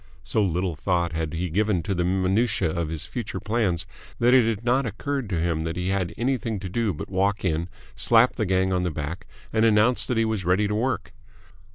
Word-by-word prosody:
So 110 Hz, -, 0 dB
little 90 Hz, -2 st, -1 dB
thought 85 Hz, 0 st, 0 dB
had 80 Hz, -1 st, -2 dB
he 85 Hz, +2 st, -2 dB
given 100 Hz, -1 st, +1 dB
to 100 Hz, -, -1 dB
the 90 Hz, -1 st, 0 dB
minutiae 95 Hz, +1 st, +1 dB
of 85 Hz, -2 st, -2 dB
his 80 Hz, -2 st, -3 dB
future -, -, -5 dB
plans 105 Hz, -6 st, 0 dB, 0.3 s
that 120 Hz, +1 st, +4 dB
it 125 Hz, -3 st, +5 dB
had 110 Hz, +1 st, -3 dB
not 125 Hz, +1 st, +2 dB
occurred 135 Hz, +3 st, -3 dB
to 90 Hz, -5 st, -1 dB
him 85 Hz, -1 st, 0 dB
that 80 Hz, +1 st, -3 dB
he 90 Hz, +1 st, -2 dB
had 95 Hz, -3 st, 0 dB
anything 120 Hz, -3 st, -1 dB
to 95 Hz, -, -5 dB
do 115 Hz, +2 st, 0 dB
but 75 Hz, -, -6 dB
walk 100 Hz, +2 st, 0 dB
in, 85 Hz, 0 st, 0 dB, 0.2 s
slap 120 Hz, +2 st, +4 dB
the 110 Hz, -4 st, -1 dB
gang 95 Hz, 0 st, +2 dB
on 90 Hz, -, +1 dB
the 90 Hz, -, 0 dB
back, 75 Hz, +2 st, -5 dB, 0.3 s
and 110 Hz, 0 st, +3 dB
announce 115 Hz, +2 st, +4 dB
that 125 Hz, -, 0 dB
he 115 Hz, -, +3 dB
was 110 Hz, -4 st, -1 dB
ready 95 Hz, +4 st, +2 dB
to 105 Hz, -, -2 dB
work. 120 Hz, +4 st, -1 dB
95 Hz, 220 wpm, -25 LUFS, 85-115 Hz, 0.3 s, it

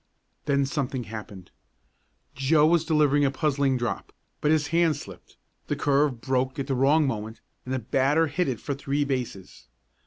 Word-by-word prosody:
Then 140 Hz, -1 st, +2 dB
something 135 Hz, -2 st, -2 dB
happened. 105 Hz, -4 st, -9 dB, 0.8 s
Joe 150 Hz, +4 st, +3 dB
was 165 Hz, 0 st, +3 dB
delivering 150 Hz, -2 st, +3 dB
a 140 Hz, -, +3 dB
puzzling 140 Hz, -2 st, +1 dB
drop, 120 Hz, -5 st, -3 dB, 0.3 s
but 150 Hz, -, +1 dB
his 150 Hz, -1 st, +2 dB
hand 165 Hz, -1 st, +3 dB
slipped, -, -, -12 dB, 0.3 s
the -, -, -1 dB
curve 140 Hz, -4 st, +1 dB
broke 130 Hz, +2 st, -1 dB
at 140 Hz, -, -2 dB
the 135 Hz, -, -2 dB
wrong 140 Hz, +4 st, +3 dB
moment 110 Hz, -3 st, -4 dB, 0.3 s
and 130 Hz, -, -6 dB
the 130 Hz, -, 0 dB
batter 135 Hz, +6 st, +2 dB
hit 170 Hz, +4 st, -1 dB
it 125 Hz, -4 st, -2 dB
for 140 Hz, -, -3 dB
three 140 Hz, +1 st, -1 dB
bases. 125 Hz, -8 st, -5 dB
140 Hz, 165 wpm, -26 LUFS, 125-150 Hz, 0.8 s, Joe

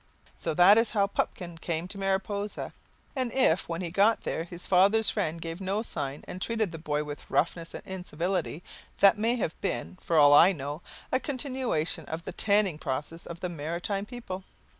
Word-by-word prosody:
So 155 Hz, -, -2 dB
that 195 Hz, +6 st, +8 dB
is 230 Hz, -, +1 dB
how 200 Hz, -, +5 dB
Pupkin 175 Hz, -4 st, -3 dB
came 165 Hz, 0 st, -2 dB
to 200 Hz, -, -7 dB
Mariposa. 195 Hz, +1 st, -2 dB, 0.4 s
And 255 Hz, -3 st, 0 dB
if, 210 Hz, -12 st, +2 dB
when 165 Hz, +1 st, -3 dB
he 170 Hz, -2 st, -4 dB
got 205 Hz, +5 st, +4 dB
there, 165 Hz, -, -2 dB
his 175 Hz, 0 st, -6 dB
father's 200 Hz, +3 st, +4 dB
friend 160 Hz, +1 st, -1 dB
gave 165 Hz, +2 st, -6 dB
no 195 Hz, +3 st, -1 dB
sign, 145 Hz, -9 st, -4 dB
and 185 Hz, -, -7 dB
treated 220 Hz, -4 st, 0 dB
the 165 Hz, -, -7 dB
boy 150 Hz, -1 st, -1 dB
with 145 Hz, -1 st, -8 dB
roughness 165 Hz, +1 st, 0 dB
and -, -, -8 dB
incivility, 180 Hz, -2 st, -3 dB, 0.3 s
that 200 Hz, +2 st, +6 dB
may 230 Hz, +3 st, +2 dB
have 195 Hz, -9 st, -1 dB
been, 185 Hz, -1 st, -3 dB
for 165 Hz, -, 0 dB
all 145 Hz, -1 st, +8 dB
I 175 Hz, +6 st, +8 dB
know, 145 Hz, 0 st, -5 dB, 0.3 s
a 260 Hz, -, +3 dB
continuation 255 Hz, -, -1 dB
of 160 Hz, +3 st, -6 dB
the 190 Hz, -, -5 dB
"tanning" 200 Hz, -5 st, +3 dB
process 150 Hz, +4 st, -4 dB
of 170 Hz, 0 st, -8 dB
the 180 Hz, -, -2 dB
Maritime 175 Hz, +6 st, -3 dB
people. 215 Hz, -7 st, -7 dB
180 Hz, 185 wpm, -28 LUFS, 165-205 Hz, 0.4 s, that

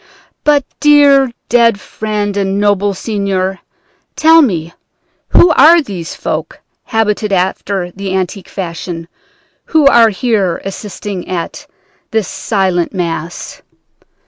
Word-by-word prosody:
But, 290 Hz, -2 st, +3 dB
dear 285 Hz, -3 st, +5 dB, 0.2 s
dead 230 Hz, -3 st, +3 dB
friend 210 Hz, -2 st, -3 dB
and 195 Hz, 0 st, -1 dB
noble 205 Hz, -1 st, +1 dB
seigneur, 195 Hz, -2 st, -2 dB, 0.6 s
tell 325 Hz, +1 st, +6 dB
me, 170 Hz, -, -1 dB, 0.6 s
who 345 Hz, -, +5 dB
are 330 Hz, +2 st, +6 dB
these 190 Hz, -, -6 dB
folk, -, -, -4 dB, 0.3 s
habited 210 Hz, -1 st, -1 dB
after 190 Hz, 0 st, -1 dB
the 190 Hz, 0 st, -4 dB
antique 190 Hz, +1 st, -3 dB
fashion, 170 Hz, -2 st, -6 dB, 0.6 s
who 315 Hz, -3 st, +2 dB
are 235 Hz, -4 st, +6 dB
here 205 Hz, -5 st, 0 dB
assisting 195 Hz, -1 st, -6 dB
at 175 Hz, -2 st, -5 dB, 0.4 s
this 220 Hz, -3 st, -1 dB
silent 190 Hz, -4 st, -1 dB
Mass?' 170 Hz, -1 st, -4 dB
200 Hz, 110 wpm, -14 LUFS, 185-230 Hz, 0.6 s, tell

